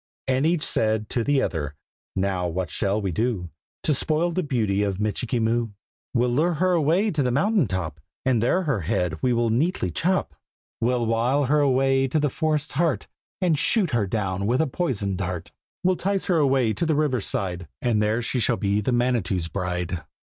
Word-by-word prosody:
And 135 +3 +2
each 170 -2 +1
said 110 -1 0
to 120 - 0
the 140 +1 +2
other 75 -3 -3 0.4
"Now 95 -2 0
what 85 -1 -3
shall 100 +3 0
we 100 -3 -2
do 95 -3 -1 0.3
To 155 - +2
spoil 155 +5 +1
the 185 - 0
beauty 110 - 0
of 100 -2 -1
Michikee 110 +3 -1
Moo?" 115 +1 +1 0.5
"We'll 120 0 +2
lure 160 +7 +2
her 185 +4 +2
away 175 +6 +2
to 155 -4 0
the 125 - +1
mountain 160 - +2
top, 85 -5 -3 0.3
And 125 -4 +2
there 180 +11 +2
her 140 - 0
head 85 -3 -1
we 125 - +2
will 120 -1 +1
neatly 125 - 0
chop!" 180 - 0 0.5
"We'll 120 0 +1
wile 120 +5 +2
her 150 +4 +3
away 135 -1 +3
to 155 +4 0
the 145 -2 +1
forest's 155 -1 0
heart, 165 +2 0 0.3
And 170 -5 +2
shoot 195 -2 +3
her 115 -5 +1
down 100 -2 -1
with 125 +3 +2
a 160 - +3
poisoned 110 - -2
dart!" 90 -3 -4 0.3
"We'll 185 0 +2
'tice 195 0 -1
her 180 -4 +2
away 135 -6 +3
to 170 - -1
the 160 - +2
river 145 -5 +1
side, 90 -3 -2
And 115 -4 +1
there 110 +3 +1
she 125 - -1
shall 115 +1 +2
be 100 +1 +1
the 115 - -1
Manitou's 115 -9 0
bride!" 90 -2 -3
120 Hz, 195 wpm, -24 LUFS, 100-150 Hz, 0.5 s, her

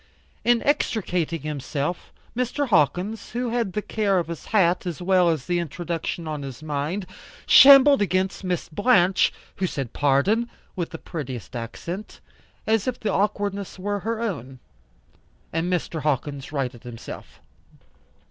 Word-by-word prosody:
In 240 -1 +3
extricating 180 - 0
himself, 150 +2 -3 0.2
Mr. 255 +3 -1
Hawkins, 190 +5 +1
who 245 0 -1
had 230 -6 -1
the 210 - -2
care 205 -3 +1
of 170 -2 -1
his 170 - -6
hat 185 -3 +2
as 170 - -4
well 180 -1 +3
as 155 -6 -1
the 175 -1 0
introduction 170 0 -4
on 150 -2 -4
his 135 +1 -8
mind, 155 +6 -2 0.4
shambled 275 -1 +9
against 185 0 0
Miss 180 -2 -2
Blanche, 195 0 +3 0.3
who 190 - 0
said 135 -8 -4
pardon, 185 - +2 0.3
with 175 -3 -3
the 165 - -7
prettiest 130 -8 -7
accent, 170 - -6 0.5
as 220 0 +1
if 250 -1 -2
the 205 -3 -1
awkwardness 200 -1 -1
were 205 +2 -2
her 225 +3 -3
own. 140 - -4 1.0
And 165 +2 -1
Mr. 170 -2 -2
Hawkins 140 -1 -2
righted 130 -5 -3
himself. 120 -2 -10
180 Hz, 140 wpm, -24 LUFS, 150-210 Hz, 1.0 s, shambled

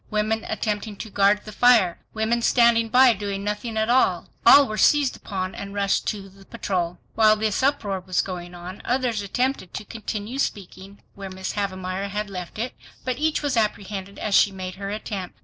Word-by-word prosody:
Women 215 +1 0
attempting 215 -1 -2
to 220 +1 -8
guard 200 +1 +3
the 215 - -8
fire; 220 -6 +4
women 225 +2 0
standing 235 -1 +4
by 255 +1 +6
doing 200 -1 -4
nothing 210 +2 -3
at 220 0 +1
all; 250 +2 +2 0.2
all 285 0 +9
were 215 - -4
seized 290 -3 +4
upon 185 -2 -4
and 200 0 -7
rushed 200 -1 0
to 200 -2 -3
the 195 0 -17
patrol. 180 -5 -3 0.2
While 215 -1 +5
this 215 -1 -1
uproar 245 -8 0
was 185 -1 -1
going 180 -2 -7
on, 180 +2 -9
others 245 -3 0
attempted 245 -1 -2
to - - -5
continue 220 +3 -5
the - - +4
speaking 195 0 -10
where 195 -1 -8
Mrs. 190 0 -5
Havemeyer 190 -1 -3
had 205 +1 -4
left 180 0 -7
it, 235 +4 -3 0.3
but 255 -1 -2
each 310 0 0
was 285 -3 0
apprehended 200 -3 -2
as 210 - -3
she 200 - +5
made 185 -1 -6
her 195 +1 -6
attempt. 200 -3 -5
205 Hz, 190 wpm, -24 LUFS, 195-230 Hz, 0.3 s, all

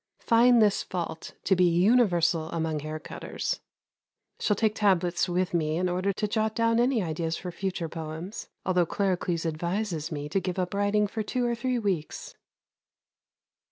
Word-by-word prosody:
Find 235 0 +5
this 205 -2 +3
fault 170 -3 -5
to 190 - +3
be 180 0 +4
universal 175 -3 +3
among 160 -2 -1
haircutters. 155 +1 -4 0.8
Shall 210 - +2
take 215 +1 +1
tablets 185 -5 +2
with 180 0 0
me 155 -2 +1
in 180 +1 +1
order 185 +2 0
to 210 +2 -2
jot 220 +1 0
down 230 0 +2
any 240 -3 +2
ideas 165 0 -2
for 180 - -6
future 185 -2 -3
poems, 160 +5 -6 0.2
although 180 -2 +2
Claricles 180 -3 -1
advises 170 +1 -2
me 145 -1 -4
to 195 - +1
give 185 -1 -4
up 180 0 -1
writing 205 +1 +2
for 220 +2 -3
two 245 +3 -1
or 240 - +1
three 250 +2 -1
weeks. 190 -9 -3
185 Hz, 160 wpm, -27 LUFS, 165-210 Hz, 0.8 s, Find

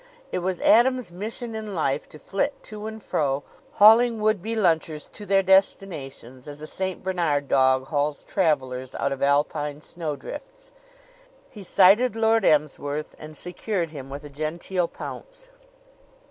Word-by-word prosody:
It - - -1
was 180 0 -2
Adams' 250 -2 +4
mission 225 +6 -6
in 215 -2 -5
life 145 -3 -1
to - - -12
flit 195 - -2
to 215 -1 -7
and 220 -1 -8
fro, 140 -1 -1 0.3
hauling 225 +2 +6
would 215 -3 +1
be 225 +4 -3
lunchers 160 -6 +1
to 205 - -6
their 195 0 +3
destinations, 150 -10 0
as 145 0 -8
a 155 - -7
St. 190 +3 -3
Bernard 165 -7 0
dog 130 -1 +3
hauls 145 -1 -1
travelers 130 -8 -1
out 140 - -1
of 135 - -4
Alpine 145 +1 +1
snowdrifts. 285 - -7 0.8
He 210 - -11
sighted 200 +5 +4
Lord 225 -1 +3
Emsworth 150 -1 0
and 155 0 -10
secured 180 0 -3
him 135 -3 -8
with 140 +2 -7
a 145 - -9
genteel 170 +5 -2
pounce. - - -9
175 Hz, 145 wpm, -25 LUFS, 145-215 Hz, 0.8 s, hauling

